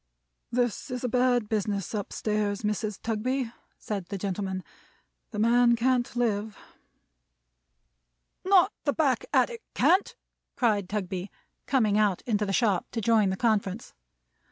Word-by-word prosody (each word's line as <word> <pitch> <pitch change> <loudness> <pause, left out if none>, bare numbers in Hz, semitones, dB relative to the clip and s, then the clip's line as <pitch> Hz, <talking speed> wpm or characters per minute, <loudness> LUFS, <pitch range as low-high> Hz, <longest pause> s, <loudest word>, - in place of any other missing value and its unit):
"This 245 +1 -1
is 250 -1 -4
a - - +1
bad 245 -2 +2
business 205 -3 -2
up 205 -3 -3
stairs, 210 -1 -1
Mrs. 210 0 -2
Tugby," 235 +2 -1 0.2
said 200 -5 -5
the 200 - -4
gentleman. 190 -1 -3 0.7
"The 215 - -7
man 235 +2 +4
can't 245 +1 +1
live." 220 -3 -1 1.9
"Not 385 +1 +5
the 285 - +1
back 275 -6 +1
attic 470 -2 +2
can't!" 375 +3 +3 0.4
cried 210 -6 +1
Tugby, 190 -2 -3 0.4
coming 215 -6 +2
out 205 -4 +1
into 210 -3 0
the - - -1
shop 205 -4 +2
to 230 - -1
join 220 -2 +3
the 190 - -2
conference. 215 -2 0
215 Hz, 130 wpm, -27 LUFS, 205-245 Hz, 1.9 s, Not